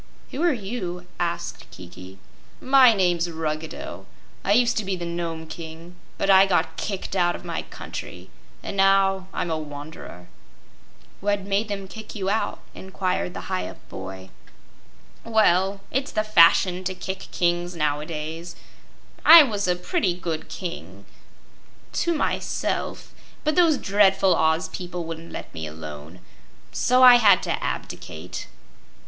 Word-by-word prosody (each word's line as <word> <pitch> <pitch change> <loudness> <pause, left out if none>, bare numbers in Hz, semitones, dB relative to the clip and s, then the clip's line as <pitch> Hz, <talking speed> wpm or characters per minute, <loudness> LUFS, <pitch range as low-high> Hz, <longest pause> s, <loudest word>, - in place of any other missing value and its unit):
"Who 275 - -4
are 345 0 +4
you?" 195 -7 -5
asked 170 -1 -3
Kiki. 90 +1 -12 0.4
"My 260 -2 +6
name's 175 -4 +1
Ruggedo. 160 -1 -5 0.4
I 200 - +2
used 240 +2 +3
to 215 - 0
be 195 -1 -2
the 175 -1 -5
Nome 170 -1 -4
King; 165 +2 -9 0.2
but - - -1
I 195 0 +7
got 175 -3 +1
kicked 195 +1 -4
out 175 -2 +2
of - - -10
my - - -3
country, - - -9 0.3
and - - -5
now 195 -1 +3
I'm 170 - -3
a 160 - -1
wanderer." 145 - -9 0.9
"What 205 0 0
made 200 +2 -1
them 200 -2 -5
kick 220 +3 -10
you 195 -2 -1
out?" 220 - -1
inquired 185 -1 -3
the - - -5
Hyup 185 -1 -4
boy. 95 0 -8 0.9
"Well, 195 -3 +2
it's 270 +2 -1
the 215 - 0
fashion 185 -2 +5
to 185 0 -2
kick 190 +1 -6
kings 175 0 0
nowadays. 155 +2 -3 0.7
I 330 -1 +11
was 205 -7 -2
a 180 - +2
pretty 180 - -1
good 170 -3 -5
King 90 +7 -7 0.9
to 340 -1 0
myself 295 - -2 0.3
but 305 - +1
those 335 -5 +4
dreadful 195 -3 +3
Oz 160 +2 +2
people 175 -1 -6
wouldn't 165 0 -8
let - - -8
me 80 -1 -5
alone. 75 +2 -9 0.5
So 255 +1 +3
I 250 -1 +10
had 205 -6 +5
to - - -2
abdicate." 80 +3 -6
180 Hz, 140 wpm, -24 LUFS, 160-200 Hz, 0.9 s, I